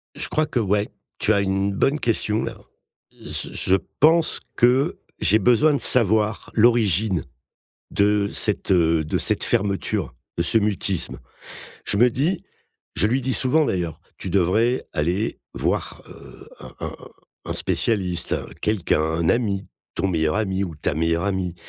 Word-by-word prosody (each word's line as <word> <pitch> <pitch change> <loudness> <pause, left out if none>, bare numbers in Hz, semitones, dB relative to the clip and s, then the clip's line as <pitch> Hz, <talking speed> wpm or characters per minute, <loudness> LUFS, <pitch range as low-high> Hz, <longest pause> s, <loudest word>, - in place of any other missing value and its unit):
Je - - -3
crois 155 - 0
qu'ouais, 105 -5 0 0.3
tu 110 - +3
as 100 - +2
une 95 0 -1
bonne 140 +9 +1
question 110 -3 +1
là. - - -5 0.6
J - - +1
je 95 - +3 0.2
pense 160 +2 +5 0.2
que 125 +3 +2 0.2
j'ai 105 - +3
besoin 125 +8 +3
de 140 - -1
savoir 110 -2 +2
l'origine 110 - +2 0.7
de 100 0 +2
cette, 105 -2 +1
heu, 85 -3 +3
de 75 - -2
cette - - 0
fermeture, 100 - 0 0.2
de 85 - +1
ce 100 - +4
mutisme. 100 -4 -1 0.7
Je - - -1
me 120 +4 +5
dis 150 +10 -1 0.5
je 100 - +3
lui 125 +5 +1
dis 130 0 0
souvent 150 +5 +3
d'ailleurs: 85 - -3 0.2
«Tu 95 - -5
devrais 100 +7 +1
aller 90 +8 -1 0.2
voir, - - -2
heu, - - -14
un - - -10
un - - -3
un - - -11 0.5
un - - -3
spécialiste, 90 -6 0 0.3
quelqu'un, 105 -6 0
un 80 +1 -1
ami, 105 -5 -1 0.3
ton 95 +3 0
meilleur 80 -3 0
ami, 95 -3 -1
ou 85 -4 -7
ta - - -2
meilleure 80 +3 0
amie 95 -3 -2
100 Hz, 150 wpm, -22 LUFS, 90-115 Hz, 0.7 s, pense